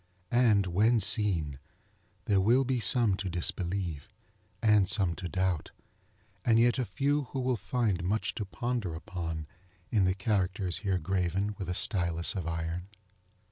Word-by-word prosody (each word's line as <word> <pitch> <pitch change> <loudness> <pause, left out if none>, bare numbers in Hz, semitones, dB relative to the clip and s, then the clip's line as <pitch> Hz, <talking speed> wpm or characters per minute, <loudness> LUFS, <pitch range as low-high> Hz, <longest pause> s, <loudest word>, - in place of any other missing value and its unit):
And, 115 -5 +4
when 105 +6 +3
seen, 95 - +1 0.7
there 100 -2 +3
will 120 +7 +4
be 130 -1 0
some 115 -2 +3
to 100 -2 -3
disbelieve, 85 -2 -3 0.5
and 105 -4 +4
some 100 -5 +1
to 90 -1 -5
doubt, 90 -3 -1 0.7
and 115 -2 +4
yet 120 +2 +3
a 125 - 0
few 140 +7 0
who 130 +3 -5
will 130 0 +1
find 110 -6 -1
much 105 +5 -1
to 105 - -4
ponder 100 -1 -3
upon 80 -2 -5 0.5
in 105 -5 +3
the 95 0 +1
characters 95 -3 0
here 95 -3 0
graven 95 +3 -1
with 95 -3 -4
a 90 - -1
stylus 85 -3 +1
of 90 -5 -4
iron. 80 +2 -3
95 Hz, 150 wpm, -30 LUFS, 90-110 Hz, 0.7 s, And